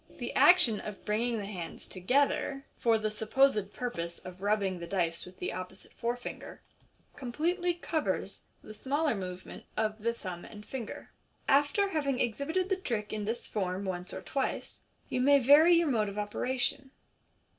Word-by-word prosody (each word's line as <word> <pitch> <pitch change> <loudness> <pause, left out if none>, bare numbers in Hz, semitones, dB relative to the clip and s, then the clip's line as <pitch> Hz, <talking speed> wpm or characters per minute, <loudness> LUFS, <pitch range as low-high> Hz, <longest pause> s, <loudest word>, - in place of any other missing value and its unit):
The - - -4
action 255 - +6
of 210 -2 -8
bringing 230 +3 0
the 205 - -4
hands 185 -5 -7
together, 275 +6 +1
for 230 -2 +4
the 215 0 -1
supposed 215 -1 +2
purpose 170 -10 -4
of 185 0 -11
rubbing 200 -3 +1
the 170 - -6
dice 170 -2 -1
with 180 - -13
the - - -3
opposite 185 +1 -8
fore 235 +1 -2
finger, 245 - -8 0.6
completely 340 +8 -1
covers 325 -2 -2 0.2
the 215 - -9
smaller 285 +6 0
movement 185 -3 -7
of 215 0 0
the 235 +2 0
thumb 180 -5 -6
and 210 -1 -11
finger. 250 -5 -7 0.4
After 290 +9 +3
having 280 -7 0
exhibited 295 - 0
the 385 - +2
trick 230 - -3
in 210 -1 -2
this 230 +3 -2
form 190 -1 -2
once 180 -1 -3
or - - -6
twice, 270 -1 -2 0.3
you 250 - -1
may 280 +2 +6
vary 290 +6 +7
your 335 -1 +3
mode 215 -4 +1
of 200 - -8
operation. 250 +5 0
225 Hz, 165 wpm, -31 LUFS, 200-275 Hz, 0.6 s, vary